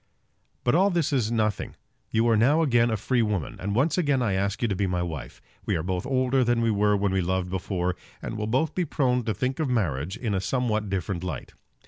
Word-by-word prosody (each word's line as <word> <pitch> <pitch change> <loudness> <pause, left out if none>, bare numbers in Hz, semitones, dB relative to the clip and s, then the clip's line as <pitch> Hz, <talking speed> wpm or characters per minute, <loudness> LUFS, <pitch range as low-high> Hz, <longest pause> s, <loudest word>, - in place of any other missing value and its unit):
But 120 - +2
all 190 +5 +4
this 170 -6 0
is 120 -5 +1
nothing. 110 -2 -1 0.3
You 115 +1 +2
are 115 - +4
now 140 +9 +4
again 120 -5 +3
a 110 - 0
free 125 +3 +1
woman; 105 -8 -2
and 100 +2 -2
once 150 +9 +2
again 145 -6 +2
I 115 -6 +1
ask 100 +3 -1
you - - +3
to 100 - -1
be 95 +1 0
my 90 -1 -1
wife. 80 -8 -7 0.2
We - - 0
are 80 - -1
both 90 +2 -2
older 130 0 +2
than 120 -1 +2
we 115 -1 +2
were 105 0 +3
when 100 -1 0
we 95 0 +1
loved 90 0 -1
before, 90 -1 -1 0.2
and - - -5
will 105 -1 -3
both 135 +7 +1
be 180 - 0
prone 130 -5 +1
to 110 - 0
think 130 - -2
of 155 -4 0
marriage 90 - -1
in 115 -5 -2
a 95 - 0
somewhat 110 -2 -1
different 90 -2 -2
light. 90 -6 -5
110 Hz, 235 wpm, -26 LUFS, 95-125 Hz, 0.3 s, all